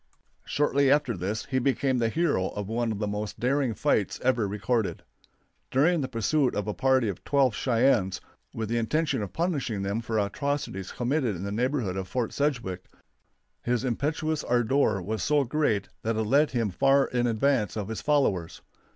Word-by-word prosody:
Shortly 140 -1 +2
after 145 -4 +2
this 100 +6 -3
he 130 -1 0
became 130 0 +1
the 115 -1 +1
hero 145 - +1
of 105 -1 -5
one 115 +1 -1
of 105 - -3
the 105 - -2
most 105 0 -4
daring 130 -2 +1
fights - - 0
ever 125 -4 +2
recorded. 105 +2 -1 0.7
During 155 +5 +3
the 130 - -2
pursuit 130 +4 +1
of 105 0 -2
a 105 - -1
party 130 -1 +2
of 100 -3 -5
twelve 135 -4 +2
Cheyennes, 115 -6 +2 0.3
with 110 -1 -4
the 120 +2 0
intention 150 +3 0
of 100 -3 -5
punishing 140 - -1
them 100 +4 -1
for 115 -1 -2
atrocities 105 -1 -2
committed 125 -3 0
in 90 - -6
the 100 - -3
neighborhood 120 -4 -1
of 95 -1 -4
Fort 115 +4 -2
Sedgwick, 120 -11 -2 0.8
his 120 0 0
impetuous 150 +5 -1
ardor 120 -4 +1
was 110 +2 -3
so 150 -1 +2
great 135 -6 0
that 115 0 -1
it 110 - 0
led 140 +8 +3
him 115 -5 -1
far 135 +7 +3
in 120 -1 0
advance 115 -1 +1
of 105 -2 -3
his 110 - -4
followers. 105 - 0
120 Hz, 175 wpm, -27 LUFS, 105-140 Hz, 0.8 s, During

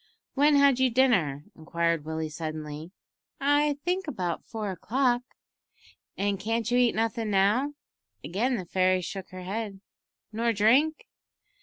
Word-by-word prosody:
"When 290 +2 +4
had 280 -2 +5
you 260 0 +4
dinner?" 220 - +2
inquired 170 -1 -1
Willie 160 0 -3
suddenly. 155 0 -6 0.5
"I 290 +1 +2
think 360 0 -1
about 180 - -3
four 215 -3 -4
o'clock." 245 +6 +1 1.0
"An' 200 0 0
can't 225 +3 -1
you 245 - +4
eat 245 -1 +3
nothin' 225 0 -1
now?" 210 +9 +2 0.5
Again 240 +8 0
the 185 - -4
fairy 185 +1 +2
shook 190 +2 -6
her 185 0 -9
head. 200 +1 -4 0.5
"Nor 230 +1 0
drink?" 255 +10 +3
215 Hz, 135 wpm, -27 LUFS, 180-255 Hz, 1.0 s, had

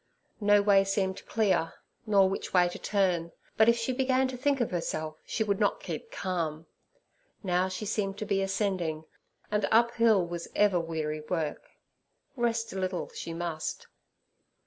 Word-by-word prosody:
No 205 -1 +4
way 200 -1 +5
seemed 195 -1 -1
clear, 200 -7 +1 0.3
nor 200 -2 +5
which 195 0 -4
way 180 -1 +6
to - - -8
turn. 180 -5 0 0.2
But 220 +1 +5
if 235 - +4
she 235 +3 -1
began 260 0 +2
to 260 - -5
think 275 +2 +1
of 240 - 0
herself 155 -3 -3
she 220 - 0
would 200 -2 0
not - - +2
keep 470 - -6
calm. 165 - -3 0.8
Now 180 -1 +1
she 190 +3 -5
seemed 195 -1 -2
to 215 - -4
be 200 -2 +1
ascending, 190 -5 -1 0.5
and 210 -1 +1
uphill 230 -4 +4
was 170 0 -5
ever 205 -4 +4
weary 155 -2 -3
work; 165 -4 -2 0.7
rest 230 -3 -1
a 190 - -3
little 185 -1 -2
she 165 - -6
must. 165 -1 -4
195 Hz, 160 wpm, -29 LUFS, 175-215 Hz, 0.8 s, way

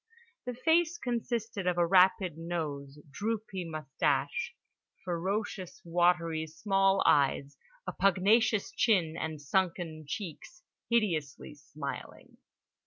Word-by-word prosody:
The 250 - -3
face 325 +5 +2
consisted 230 - -3
of 180 -1 +1
a 175 - +4
rapid 185 0 +4
nose, 155 -4 -4
droopy 205 0 -3
moustache, 160 - -1 0.5
ferocious 185 +2 -3
watery 170 -2 +2
small 195 +3 +2
eyes, 140 0 +3 0.3
a - - -4
pugnacious 200 +3 +3
chin, 180 -8 +2
and 160 -2 -4
sunken 165 0 -1
cheeks 200 - -7 0.3
hideously 165 - 0
smiling. 145 -1 -8
180 Hz, 100 wpm, -30 LUFS, 160-215 Hz, 0.5 s, a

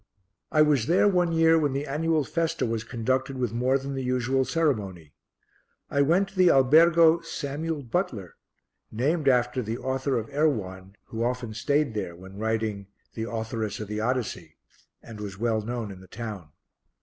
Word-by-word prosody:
I 155 -1 +5
was 145 -7 +2
there 175 +5 +4
one 180 -3 +2
year 165 0 +4
when 145 -3 0
the 140 +2 -2
annual 155 +2 0
festa 165 +3 -1
was 115 -1 -2
conducted 130 +3 -2
with 125 -4 -2
more 125 +3 +2
than 140 +1 -6
the 135 - -3
usual 130 +1 +1
ceremony. 100 - -1 0.8
I 140 - +2
went 175 +7 +3
to 195 - -20
the 185 -1 +5
Albergo 165 +5 +6
Samuel 155 -1 -4
Butler, 115 - -3 0.6
named 145 +7 0
after 125 0 +2
the 115 0 -4
author 130 0 -1
of 115 -1 -3
Erewhon, 100 -11 -1
who 115 0 -4
often 120 -2 -2
stayed 140 +3 0
there 95 -5 -4
when 95 +3 -12
writing 110 -2 -2 0.3
The 115 0 -4
Authoress 110 -2 -3
of 105 - -5
the 105 0 -3
Odyssey, 110 -9 -3 0.5
and 110 -2 -10
was 100 -2 -6
well 110 0 0
known 115 -1 -4
in 95 - -10
the 95 - -15
town. 105 -9 -7
125 Hz, 170 wpm, -26 LUFS, 110-150 Hz, 0.8 s, Albergo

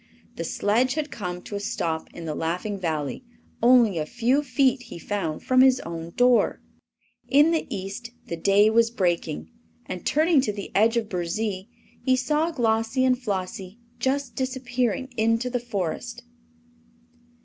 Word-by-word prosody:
The 165 - -4
sledge 235 - +1
had 305 -2 -3
come 180 -4 -5
to 205 - -7
a - - -2
stop 165 -5 -3
in 170 - -9
the 155 - -3
Laughing 180 +6 -3
Valley, 155 - -3 0.4
only 235 -7 +5
a 155 - -1
few 245 - +1
feet, 275 -3 +2
he - - -7
found, 170 -4 -3
from 255 0 +4
his 260 -1 +5
own 165 0 -6
door. 245 -1 +3 0.7
In 295 +4 +5
the 325 - 0
East 195 +5 -5 0.2
the 170 - -4
day 200 +5 +4
was 230 +1 +4
breaking, 170 - -1 0.3
and 180 - -6
turning 310 -1 +3
to 255 - -1
the 200 -1 -7
edge 225 +3 +4
of 225 -2 0
Burzee 190 +2 -3 0.3
he 260 - +3
saw 300 +6 +1
Glossie 230 -2 +1
and 255 -1 +4
Flossie 190 -2 -4 0.2
just 270 0 -1
disappearing 255 -1 -2
in 225 +1 +3
the 250 +1 -2
Forest. 235 +2 -4
225 Hz, 155 wpm, -25 LUFS, 185-255 Hz, 0.7 s, only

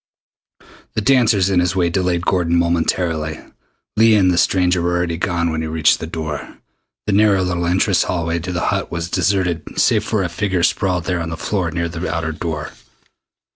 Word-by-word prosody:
The 110 - 0
dancers 110 -6 +3
in 90 - +3
his 90 +1 0
way 85 -2 +1
delayed 90 -1 0
Gordon 85 -3 +1
momentarily. 85 -2 0 0.6
Leah 110 -1 +5
and 90 -2 +4
the 85 - 0
stranger 90 -1 +2
were 90 +1 0
already 85 -1 -1
gone 85 0 -1
when 80 0 -2
he 80 - -3
reached 80 -1 +2
the 80 - -5
door. 80 -3 -6 0.5
The 105 - 0
narrow 100 -2 +4
little 90 -1 -1
entrance 90 +2 +2
hallway 85 -1 -1
to 90 +3 -5
the 85 -1 -2
Hut - - -3
was 85 0 -4
deserted 90 -6 -1
save - - +3
for 105 -3 -1
a - - 0
figure 95 0 -1
sprawled 90 -3 +1
there 90 -1 -2
on 80 - -4
the 80 - -5
floor 95 -4 -2
near 85 +1 -2
the 85 +2 -4
outer 80 -1 -2
door. 80 -1 -5
85 Hz, 190 wpm, -19 LUFS, 85-95 Hz, 0.6 s, Leah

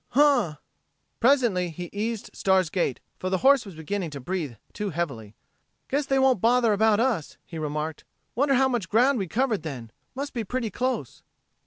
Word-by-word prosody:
Huh!" 275 - +4 0.6
Presently 235 -9 +3
he 175 +1 -7
eased 220 +1 -3
Star's 190 -4 +2
gait, 170 -8 -1 0.2
for 185 - -2
the 185 - +1
horse 275 -5 +5
was 190 - -10
beginning 170 +3 -3
to 145 -2 -7
breath 145 - -4 0.2
too 210 -1 -3
heavily. 135 - -4 0.5
"Guess 280 +1 0
they 270 - +2
won't 265 -6 +3
bother 235 -1 +4
about 215 0 +3
us," 230 - 0
he 165 - -7
remarked. 150 0 -3 0.3
"Wonder 275 +2 +2
how 265 +1 +4
much 240 -9 -2
ground 245 +4 +3
we 190 - -2
covered 230 +2 0
then. 125 -8 -7 0.2
Must 280 +2 -4
be 235 -3 -2
pretty 235 +1 -3
close...." 245 - -2
205 Hz, 175 wpm, -26 LUFS, 165-255 Hz, 0.6 s, horse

